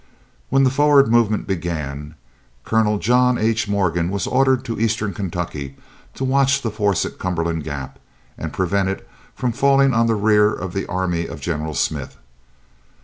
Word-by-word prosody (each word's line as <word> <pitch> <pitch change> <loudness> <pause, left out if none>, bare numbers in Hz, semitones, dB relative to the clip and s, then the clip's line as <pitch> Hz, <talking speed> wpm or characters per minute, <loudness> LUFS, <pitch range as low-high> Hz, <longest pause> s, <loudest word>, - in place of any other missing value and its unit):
When 135 +1 +3
the 130 - +3
forward 145 -1 +4
movement 115 -3 +2
began, 80 -5 -4 0.5
Colonel 110 -2 +2
John 125 +3 +3
H. 110 -1 0
Morgan 90 -4 0
was 100 +1 -2
ordered 130 -1 +2
to 115 - -4
Eastern 110 -2 0
Kentucky 85 -7 -5 0.4
to - - -4
watch 135 +1 +2
the 115 - -1
force 100 -3 0
at - - -8
Cumberland 85 -3 -2
Gap 70 -3 -6 0.4
and - - -6
prevent 95 +1 0
it 95 - -5 0.3
from 125 -2 -1
falling 135 +2 +3
on 115 +1 +3
the 115 - +2
rear 105 0 +3
of 90 -3 -5
the 95 - -3
army 90 -2 -1
of 80 - -8
General 75 0 -3
Smith. - - -2
100 Hz, 160 wpm, -20 LUFS, 85-120 Hz, 0.5 s, forward